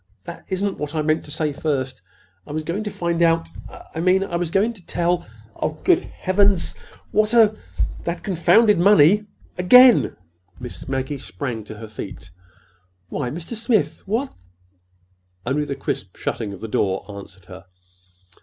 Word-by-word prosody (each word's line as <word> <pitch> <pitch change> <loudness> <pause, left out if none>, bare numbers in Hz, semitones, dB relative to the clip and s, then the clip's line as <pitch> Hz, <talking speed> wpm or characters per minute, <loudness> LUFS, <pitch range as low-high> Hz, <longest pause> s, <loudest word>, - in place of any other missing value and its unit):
That 170 -1 -9
isn't 195 +1 -2
what 150 +1 -4
I 155 - 0
meant 155 +1 +1
to - - -12
say 150 0 -1
first. 135 -4 -2 0.5
I - - -8
was 155 +1 -3
going 180 +7 -3
to - - -2
find 170 -3 -2
out—I 165 -1 -1
mean, 185 +3 +3
I 185 -3 -4
was 170 -1 -1
going 205 +7 +1
to 185 -6 -15
tell—Oh, 155 -6 -3
good 360 -2 +5
Heavens, 190 -1 +1 0.4
what 215 +2 +2
a—That 215 -5 0
confounded 195 +2 +4
money—again!" 205 - +5 0.4
Miss 125 -1 -8
Maggie 135 +1 -3
sprang 125 -6 -5
to 110 0 -9
her 110 0 -8
feet. 105 -3 -9 0.8
"Why, 125 - -3
Mr. 165 - -6
Smith, 215 - 0
w 220 +5 +1
what—" 275 - -9 1.1
Only 145 +4 0
the 140 - -4
crisp 95 -8 -4
shutting 110 -3 -3
of 100 - -10
the 115 - -5
door 95 -2 -1
answered 100 -3 -11
her. 95 0 -12
165 Hz, 150 wpm, -22 LUFS, 130-195 Hz, 1.1 s, good